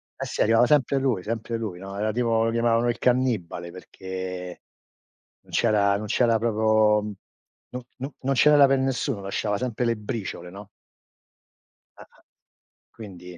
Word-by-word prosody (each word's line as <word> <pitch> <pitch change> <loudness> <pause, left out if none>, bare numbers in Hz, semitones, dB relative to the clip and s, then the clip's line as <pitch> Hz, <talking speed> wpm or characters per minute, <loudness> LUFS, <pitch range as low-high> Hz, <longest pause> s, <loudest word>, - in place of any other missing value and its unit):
Eh - - -5
sì, - - -3
arrivava 115 +2 +4
sempre 140 -2 +2
lui, 120 -9 0
sempre 115 +1 -3
lui, 100 -6 -5
no, 95 +1 -8
era 110 +1 0
tipo 115 -1 +1
lo 115 - 0
chiamavano 115 0 +1
il 120 - -2
cannibale 115 -9 0
perché 90 0 -7 0.8
non - - -21
c'era 100 -3 +2
non 105 - -6
c'era 115 +1 +2
proprio 110 -1 +2 0.7
no 125 -1 -7
no 135 +2 -6
non 135 +1 0
ce 150 - +5
n'era 145 -2 +7
per 135 0 +2
nessuno, 130 -4 -1
lasciava 100 +1 -2
sempre 125 0 -2
le 115 0 +1
briciole, 105 -5 -6
no. 100 +1 -11 1.3
Ah-ah. - - -18 0.7
Quindi 90 -5 -11
110 Hz, 155 wpm, -24 LUFS, 100-125 Hz, 1.3 s, n'era